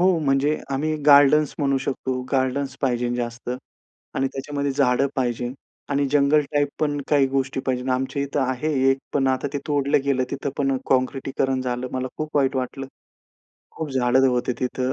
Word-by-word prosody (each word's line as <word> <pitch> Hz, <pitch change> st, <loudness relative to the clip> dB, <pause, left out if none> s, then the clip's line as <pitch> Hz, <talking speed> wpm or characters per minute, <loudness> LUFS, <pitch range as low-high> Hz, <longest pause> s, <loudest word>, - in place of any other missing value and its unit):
हो, 185 Hz, -1 st, +4 dB
म्हणजे 145 Hz, 0 st, +2 dB, 0.2 s
आम्ही 155 Hz, +3 st, 0 dB
गार्डन्स 145 Hz, +1 st, +6 dB
म्हणू 140 Hz, -2 st, +1 dB
शकतो, 130 Hz, -1 st, -3 dB
गार्डन्स 130 Hz, 0 st, 0 dB
पाहिजे 125 Hz, -2 st, 0 dB
जास्त 120 Hz, 0 st, -4 dB, 0.6 s
आणि 135 Hz, -, +1 dB
त्याच्यामध्ये 140 Hz, +1 st, -3 dB
झाडं 125 Hz, +1 st, +2 dB
पाहिजे 120 Hz, -1 st, -1 dB, 0.4 s
आणि 140 Hz, 0 st, +1 dB
जंगल 145 Hz, +1 st, +4 dB
टाइप 145 Hz, -1 st, +2 dB
पण 145 Hz, -2 st, 0 dB
काही 145 Hz, -2 st, +4 dB
गोष्टी 135 Hz, 0 st, -1 dB
पाहिजे. 130 Hz, 0 st, -1 dB
आमच्या 135 Hz, +2 st, -1 dB
इथे 140 Hz, +1 st, -3 dB
आहे 130 Hz, +4 st, -1 dB, 0.2 s
एक, 135 Hz, -, +1 dB
पण 135 Hz, -2 st, +1 dB
आता 130 Hz, +2 st, 0 dB
ते 145 Hz, -, -1 dB
तोडलं 145 Hz, -1 st, +2 dB
गेलं. 135 Hz, -2 st, +1 dB
तिथं 140 Hz, 0 st, -3 dB
पण 135 Hz, -1 st, +1 dB
काँक्रिटीकरण 135 Hz, 0 st, 0 dB
झालं, 125 Hz, 0 st, -3 dB
मला 130 Hz, 0 st, -2 dB
खूप 155 Hz, -1 st, -3 dB
वाईट 135 Hz, -1 st, +2 dB
वाटलं. 130 Hz, +1 st, -3 dB, 0.9 s
खूप 160 Hz, -2 st, -5 dB
झाडं 130 Hz, 0 st, +3 dB
होते 125 Hz, 0 st, 0 dB
तिथे 125 Hz, 0 st, -2 dB
135 Hz, 165 wpm, -23 LUFS, 130-145 Hz, 0.9 s, गार्डन्स